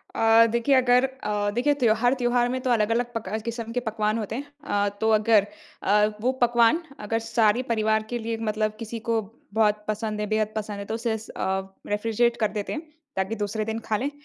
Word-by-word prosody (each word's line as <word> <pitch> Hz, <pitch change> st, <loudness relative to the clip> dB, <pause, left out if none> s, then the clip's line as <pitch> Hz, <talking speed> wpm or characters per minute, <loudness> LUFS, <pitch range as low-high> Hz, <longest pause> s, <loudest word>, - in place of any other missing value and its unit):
अ, 225 Hz, +1 st, +6 dB
देखिए 235 Hz, +4 st, +2 dB
अगर 250 Hz, -1 st, +4 dB
अ, 210 Hz, -6 st, -2 dB
देखिए 290 Hz, +5 st, +2 dB
त्योहार, 245 Hz, -1 st, +3 dB
त्योहार 245 Hz, -1 st, +1 dB
में 255 Hz, +1 st, -2 dB
तो 255 Hz, -, 0 dB
अलग-अलग 235 Hz, +1 st, +1 dB
पका 220 Hz, -1 st, -3 dB
किस्म 230 Hz, -1 st, -4 dB
के 245 Hz, -, 0 dB
पकवान 215 Hz, 0 st, 0 dB
होते 215 Hz, 0 st, -4 dB
हैं। 280 Hz, -, -4 dB, 0.2 s
अ, 205 Hz, 0 st, +1 dB
तो 220 Hz, 0 st, +2 dB
अगर 215 Hz, -1 st, +4 dB, 0.4 s
अ, 210 Hz, +1 st, +4 dB
वो 250 Hz, +4 st, +1 dB
पकवान 240 Hz, +6 st, +4 dB, 0.2 s
अगर 220 Hz, +2 st, -1 dB
सारे 225 Hz, +1 st, +3 dB
परिवार 220 Hz, -1 st, +2 dB
के 240 Hz, -, -1 dB
लिए 230 Hz, 0 st, -3 dB
मतलब 215 Hz, 0 st, -1 dB
किसी 230 Hz, 0 st, -5 dB
को 230 Hz, -1 st, +2 dB, 0.3 s
बहुत 210 Hz, -1 st, +2 dB
पसंद 215 Hz, 0 st, -2 dB
है, 210 Hz, -, -1 dB
बेहद 215 Hz, 0 st, 0 dB
पसंद 210 Hz, -1 st, -4 dB
है 200 Hz, -, -5 dB
तो -, -, 0 dB
उसे 230 Hz, -1 st, -1 dB
स 220 Hz, -, -12 dB
अ, 190 Hz, 0 st, -2 dB, 0.2 s
रेफ्रिजरेट 230 Hz, +3 st, +1 dB
कर 215 Hz, -, +3 dB
देते 205 Hz, -, -3 dB
हैं 310 Hz, -, -4 dB, 0.3 s
ताकि 190 Hz, +3 st, -1 dB
दूसरे 215 Hz, +1 st, -2 dB
दिन 220 Hz, +1 st, -3 dB
खा 215 Hz, -, +2 dB
लें। 270 Hz, +7 st, -2 dB
225 Hz, 205 wpm, -25 LUFS, 210-240 Hz, 0.4 s, अ